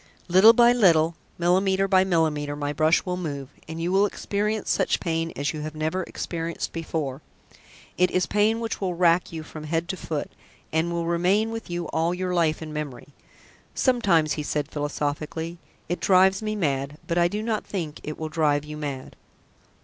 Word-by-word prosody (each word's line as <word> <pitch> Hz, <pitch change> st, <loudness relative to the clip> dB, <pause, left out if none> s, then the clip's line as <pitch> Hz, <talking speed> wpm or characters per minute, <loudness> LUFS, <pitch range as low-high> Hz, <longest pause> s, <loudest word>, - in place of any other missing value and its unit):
"Little 190 Hz, +6 st, +8 dB
by 240 Hz, +1 st, +6 dB
little, 170 Hz, -8 st, +4 dB, 0.2 s
millimetre 190 Hz, +3 st, +2 dB
by 190 Hz, -1 st, +5 dB
millimetre 155 Hz, -5 st, 0 dB
my 145 Hz, 0 st, -3 dB
brush 155 Hz, +5 st, +3 dB
will 180 Hz, -1 st, -2 dB
move, 140 Hz, -6 st, -5 dB, 0.2 s
and 160 Hz, +1 st, -6 dB
you 170 Hz, +2 st, -1 dB
will 195 Hz, +2 st, +4 dB
experience 210 Hz, +1 st, -2 dB
such -, -, +1 dB
pain 165 Hz, -1 st, -1 dB
as 145 Hz, +2 st, -1 dB
you 155 Hz, -, -5 dB
have 155 Hz, +1 st, -6 dB
never 155 Hz, +4 st, -1 dB
experienced 165 Hz, -1 st, -4 dB
before. 155 Hz, -4 st, -3 dB, 0.8 s
It 180 Hz, 0 st, +4 dB
is 180 Hz, 0 st, +1 dB
pain 215 Hz, +2 st, +2 dB
which 230 Hz, -2 st, -4 dB
will 185 Hz, -2 st, -1 dB
rack 170 Hz, 0 st, +3 dB
you 160 Hz, -1 st, -6 dB
from 155 Hz, 0 st, -9 dB
head 165 Hz, +2 st, -1 dB
to -, -, -1 dB
foot, 155 Hz, -3 st, -4 dB, 0.4 s
and 160 Hz, +2 st, +1 dB
will 170 Hz, -1 st, -1 dB
remain 185 Hz, +6 st, +2 dB
with 225 Hz, -3 st, -6 dB
you 175 Hz, 0 st, -3 dB
all 165 Hz, +2 st, 0 dB
your 180 Hz, 0 st, -2 dB
life 160 Hz, -2 st, +1 dB
in 155 Hz, -1 st, -7 dB
memory. 145 Hz, -4 st, -6 dB, 0.7 s
Sometimes," 195 Hz, -, +3 dB
he 150 Hz, -, -3 dB
said 150 Hz, 0 st, -2 dB
philosophically, 150 Hz, +3 st, -3 dB, 0.3 s
"it 175 Hz, -, -2 dB
drives 190 Hz, +1 st, +4 dB
me 215 Hz, 0 st, -2 dB
mad, 140 Hz, -5 st, -1 dB
but 170 Hz, +1 st, 0 dB
I 170 Hz, -, +5 dB
do 210 Hz, +4 st, -3 dB
not 220 Hz, -2 st, -1 dB
think 165 Hz, -6 st, -5 dB
it 150 Hz, -, -6 dB
will 160 Hz, -, -4 dB
drive 150 Hz, -2 st, +1 dB
you 150 Hz, 0 st, -7 dB
mad." 140 Hz, -3 st, -5 dB
170 Hz, 185 wpm, -25 LUFS, 155-190 Hz, 0.8 s, Little